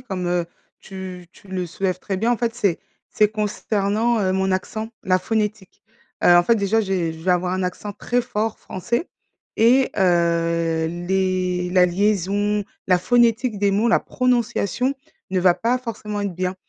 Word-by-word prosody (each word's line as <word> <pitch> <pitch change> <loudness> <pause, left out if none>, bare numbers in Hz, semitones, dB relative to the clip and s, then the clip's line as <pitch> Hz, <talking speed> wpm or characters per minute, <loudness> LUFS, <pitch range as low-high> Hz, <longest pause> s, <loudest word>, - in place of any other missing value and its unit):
comme, 190 -7 -4
heu, 175 0 0 0.4
tu 185 -2 -8
tu 200 - -19
le 185 -1 -3
soulèves 185 +2 -2
très 195 +1 -4
bien, 225 +5 +1
en - - +1
fait, 230 0 -1
c'est 200 -8 0 0.3
c'est 210 - +3
consternant, 215 +1 0
heu, 190 -2 +1
mon 190 0 +1
accent, 220 +4 -3
la 185 0 +2
phonétique. 210 -1 -3 0.4
Heu, 175 - +7
en 175 - +6
fait 230 +7 +3
déjà 205 +2 +1
j'ai 185 -5 -1
je 160 - -11
vais 185 - +2
avoir 180 0 +1
un 185 - -1
accent 195 +3 -4
très 245 +4 -1
fort 220 -2 -3
français 235 - -3 0.5
et 250 +4 +4
heu, 170 -2 +1
les 180 +1 -1
la 180 -1 +5
liaison, 205 +2 +1 0.2
la 185 -1 +4
phonétique 235 +2 +2
des 200 0 +2
mots, 210 +4 +2
la 230 - +4
prononciation 250 0 0 0.4
ne 190 -1 +1
va 180 -1 +5
pas 235 +7 0
forcément 215 -4 -5
être 200 -3 -3
bien. 185 +1 -2
195 Hz, 175 wpm, -22 LUFS, 180-220 Hz, 0.5 s, Heu